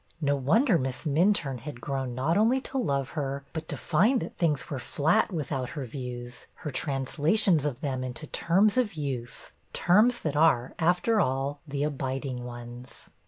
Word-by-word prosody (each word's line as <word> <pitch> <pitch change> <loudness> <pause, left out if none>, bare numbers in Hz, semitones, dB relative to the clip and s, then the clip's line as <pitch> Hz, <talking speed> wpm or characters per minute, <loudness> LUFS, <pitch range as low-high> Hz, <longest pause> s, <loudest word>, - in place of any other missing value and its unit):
No 145 -2 +1
wonder 185 - +3
Miss 130 +3 -2
Minturne 155 -3 +2
had 135 0 -8
grown 135 -2 -3
not 140 +7 +1
only 230 +5 +4
to 270 0 -3
love 140 - 0
her, 140 -3 -3
but 160 -1 -5
to - - -4
find 210 - +3
that - - -6
things 155 -5 0
were 140 - -4
flat 160 - +1
without 140 -6 -3
her 140 -3 -5
views, 125 -1 -7
her 150 - -6
translations 150 +5 +1
of 130 -5 -5
them 130 -3 -2
into 125 +3 -5
terms 200 +8 +2
of 220 -8 0
youth, 130 -6 -5 0.2
terms 220 +7 +4
that 150 -3 -2
are, 145 -6 +3
after 180 +6 +3
all, 135 +1 -1
the 140 0 -2
abiding 135 -3 -3
ones. 120 0 -10
145 Hz, 165 wpm, -28 LUFS, 130-170 Hz, 0.2 s, only